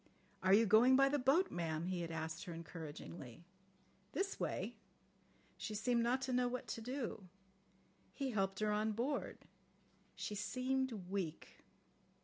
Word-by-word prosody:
'Are 190 +1 +6
you 225 +2 +6
going 230 +5 +7
by 275 +1 +6
the 290 +1 +1
boat, 275 +9 +4
ma'am,' 165 -1 -1
he 180 -1 -1
had 170 - -3
asked 160 +2 -4
her 175 - -5
encouragingly. 165 -3 -8 0.7
'This 395 0 -1
way.' - - -2 0.8
She 215 - -4
seemed 235 +2 +2
not 250 +3 +2
to 260 -1 -1
know 250 0 +3
what 250 +1 -3
to 230 - -3
do. 240 -5 -4 0.8
He 275 -2 -2
helped 195 -2 0
her 215 0 +2
on 215 +1 +1
board. 255 +7 -1 0.8
She - - -4
seemed 260 +5 0 0.2
weak." 180 -6 -3
215 Hz, 145 wpm, -38 LUFS, 175-255 Hz, 0.8 s, going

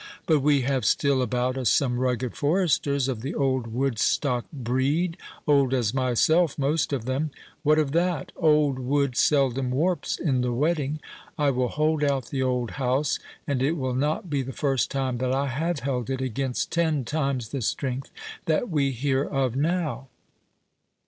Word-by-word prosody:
But 155 -3 +3
we 140 0 +3
have 130 0 0
still 140 -2 +2
about 125 +2 0
us 125 - +2
some 125 -3 +2
rugged 125 -1 -1
foresters 145 -4 +1
of 125 -5 -3
the 135 +5 -4
old 130 -4 0
Woodstock 125 +1 0
breed—old 140 +1 0
as 120 -4 0
myself 135 +6 +2
most 145 +2 0
of 130 -5 -2
them—what 150 +2 -1
of 150 -3 +1
that? 170 -2 0
old 150 -5 +3
wood 135 0 0
seldom 135 -3 +2
warps 165 +8 0
in 135 -6 0
the 125 0 0
wetting;—I 150 0 -1
will 125 -1 0
hold 155 0 +1
out 140 -3 0
the 135 - -1
old 125 -2 0
house, 130 +3 +1 0.3
and 140 -3 -1
it 140 +4 +2
will 130 -3 -2
not 150 +7 -1
be 145 -4 0
the 130 0 -6
first 135 -3 0
time 130 -3 -2
that 130 0 0
I 135 +1 +1
have 155 +3 -2
held 125 -2 -2
it 135 -1 -1
against 130 0 -2
ten 160 -6 +1
times 135 -5 -1
the 140 - -3
strength 130 +3 -2 0.4
that 165 +7 0
we 140 -3 +2
hear 135 +1 0
of 135 -4 -1
now." 155 -2 -1
135 Hz, 160 wpm, -25 LUFS, 130-150 Hz, 0.4 s, But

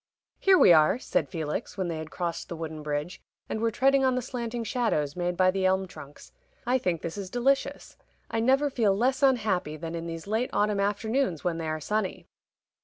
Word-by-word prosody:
"Here 385 -1 +5
we 265 - +7
are!" 155 +6 +5
said - - -1
Felix, 160 +2 -4
when 190 -2 -1
they 165 -2 -3
had 155 0 -7
crossed 170 -1 -4
the 170 - -4
wooden 160 -1 -6
bridge, 150 +4 -4 0.3
and 220 - -3
were 230 - +2
treading 270 +4 +3
on 260 -1 +3
the 255 - -1
slanting 235 -1 -4
shadows 215 - -1
made 175 0 -2
by 185 0 +4
the 190 0 -2
elm 190 0 +2
trunks. 145 -5 -12 0.3
"I 255 +2 +2
think 175 -7 -1
this 170 +4 -4
is 190 -2 -6
delicious. 265 +5 0 0.3
I 225 - -2
never 270 +5 +3
feel 210 -6 +2
less 260 +4 +1
unhappy 210 - +1
than 165 +1 -6
in 170 0 -4
these 165 -1 -6
late 220 +5 -1
autumn 205 -1 +1
afternoons 205 - 0
when 170 -2 -1
they 160 - -3
are 155 0 -2
sunny." 210 +5 -2
195 Hz, 205 wpm, -27 LUFS, 165-240 Hz, 0.3 s, we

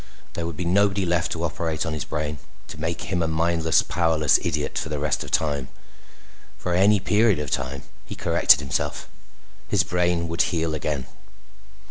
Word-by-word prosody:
There 85 -1 -3
would 85 -3 -6
be 90 - -3
nobody 100 +2 +2
left 85 -1 0
to 85 - -4
operate 80 0 -2
on 85 - -2
his 75 -4 -4
brain, 75 -1 -3 0.3
to 75 - -8
make 85 +2 -2
him 90 0 -1
a 80 - +1
mindless, 80 0 +2
powerless 80 -4 +2
idiot - - -2
for - - -4
the 75 - -2
rest 75 0 -1
of - - -8
time. 70 -4 0 0.9
For 90 - -3
any 100 +3 +4
period 105 +1 +3
of 75 -2 -4
time, 70 0 -3 0.2
he - - -8
corrected - - +4
himself. 70 - -3 0.6
His - - +2
brain 90 -1 0
would 85 +1 0
heal 80 -2 0
again. 75 -4 -2
80 Hz, 175 wpm, -24 LUFS, 75-85 Hz, 0.9 s, any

